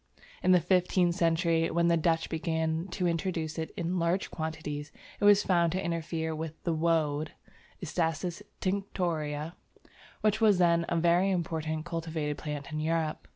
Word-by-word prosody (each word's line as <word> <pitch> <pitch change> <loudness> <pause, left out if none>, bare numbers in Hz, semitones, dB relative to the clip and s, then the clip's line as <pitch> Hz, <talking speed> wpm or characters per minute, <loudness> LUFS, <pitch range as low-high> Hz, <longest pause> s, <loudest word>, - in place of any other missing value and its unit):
In 185 - +3
the 180 - +7
fifteenth 180 -1 +2
century, 165 -1 +2
when 170 0 +2
the 170 - +4
Dutch 165 0 +1
began 160 +1 -1
to 180 0 -1
introduce 165 -2 -2
it 160 - -4
in 180 0 -1
large 170 +3 0
quantities, 155 -2 -5 0.3
it - - +1
was 205 0 +7
found 170 -3 +2
to 190 +1 -1
interfere 165 -1 -2
with 160 0 -5
the 170 - 0
"woad" 155 -2 0 0.5
(Isatis 170 +2 -1 0.2
tinctoria) 170 -5 -2 0.7
which 215 +1 +2
was 210 -4 +5
then 170 -1 +3
a 170 - 0
very 175 +3 +3
important 160 -3 -2
cultivated 160 -3 -3
plant 150 -1 -5
in 155 - -3
Europe. 160 0 -1
165 Hz, 155 wpm, -29 LUFS, 160-175 Hz, 0.7 s, the